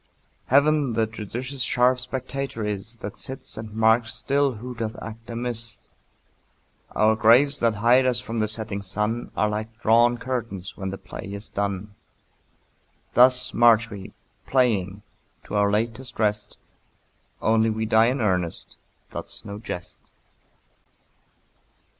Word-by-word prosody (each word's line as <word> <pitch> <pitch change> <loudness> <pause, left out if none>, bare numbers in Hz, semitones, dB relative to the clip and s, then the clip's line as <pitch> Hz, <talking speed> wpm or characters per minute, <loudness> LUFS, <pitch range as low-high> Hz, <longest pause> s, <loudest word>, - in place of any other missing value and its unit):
Heaven 145 -1 +3
the 110 0 +2
judicious 120 +5 -6
sharp 125 +1 +3
spectator 130 -1 -4
is, 105 +3 -4
That 100 -2 -7
sits 130 0 +2
and 110 -1 -6
marks 110 +1 +2
still 140 +3 +1
who 125 +3 -7
doth 115 -2 -4
act 115 +1 -10
amiss. 115 -2 -4 1.0
Our 110 +1 +4
graves 125 +6 +5
that 115 -2 +2
hide 120 +5 +4
us 125 -2 +1
from 115 -2 -4
the 110 - +1
setting 110 -2 -1
sun 105 +4 -2
Are 105 - +2
like 110 +2 -5
drawn 120 +1 +4
curtains 115 -7 -4
when 95 -1 -4
the 95 - -5
play 95 +1 -9
is 100 +1 -5
done. 100 0 -3 1.2
Thus 125 0 +5
march 115 -1 +4
we, 100 -2 -8 0.4
playing, 105 -7 +1 0.4
to - - -11
our 100 0 +3
latest 115 +4 -2
rest, 105 -1 0 0.8
Only 110 0 +2
we 110 0 -2
die 110 +1 +4
in 130 +1 0
earnest, 90 -5 0 0.3
that's - - -4
no 100 0 -7
jest. 90 -5 -7
115 Hz, 135 wpm, -24 LUFS, 105-125 Hz, 1.2 s, graves